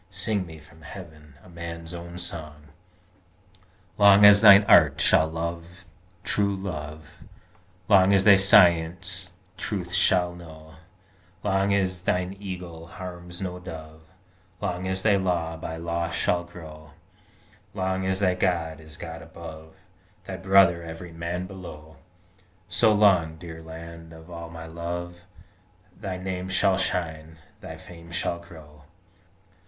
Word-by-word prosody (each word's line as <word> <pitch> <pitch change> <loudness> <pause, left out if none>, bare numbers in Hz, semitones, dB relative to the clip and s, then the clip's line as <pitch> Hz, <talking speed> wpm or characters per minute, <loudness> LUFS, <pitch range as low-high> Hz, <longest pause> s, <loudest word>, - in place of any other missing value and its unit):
Sing 95 0 -2
me 80 -1 -11
from 80 +1 -18
Heaven 80 -4 -12
a - - -17
man's 85 0 -8
own 85 0 -8
song! 75 -4 -7 1.3
"Long 100 0 +7
as 100 0 +8
thine 100 -2 +9
Art 75 -5 +6
shall 80 - +5
love 85 +2 -6 0.4
true 100 -1 +1
love, 80 -4 -7 0.7
Long 95 -2 +5
as 100 -1 +4
thy 105 -2 +9
Science 90 -1 +3 0.2
truth - - -3
shall 90 -1 +3
know, 80 -2 -13 0.7
Long 95 0 +1
as 95 -2 0
thine 90 +1 -1
Eagle 90 -4 -8
harms 90 0 -8
no 90 -1 -5
Dove, 80 -3 -10 0.6
Long 90 +1 -3
as 95 0 -2
thy 105 -2 +4
Law 85 -4 -1
by 80 0 -6
law 85 0 -3
shall 85 +1 0
grow, 80 -3 -12 0.8
Long 95 0 -1
as 95 +1 -1
thy 90 -2 +3
God 85 -4 -1
is 80 -1 -10
God 80 -1 -8
above, 80 0 -11 0.5
Thy 95 - -6
brother 95 -3 +4
every 85 +1 -9
man 85 +2 -4
below, 80 -5 -11 0.7
So 95 +6 +3
long, 95 -7 +3
dear 80 -1 -10
Land 80 0 -11
of 80 +2 -14
all 85 -1 -8
my 80 -1 -9
love, 85 +1 -6 0.7
Thy 95 -2 -5
name 95 0 -5
shall 95 0 +2
shine, 80 -3 -3 0.2
thy - - -9
fame 85 -1 -14
shall 85 0 -2
glow!" 75 -3 -15
85 Hz, 135 wpm, -25 LUFS, 80-95 Hz, 1.3 s, thine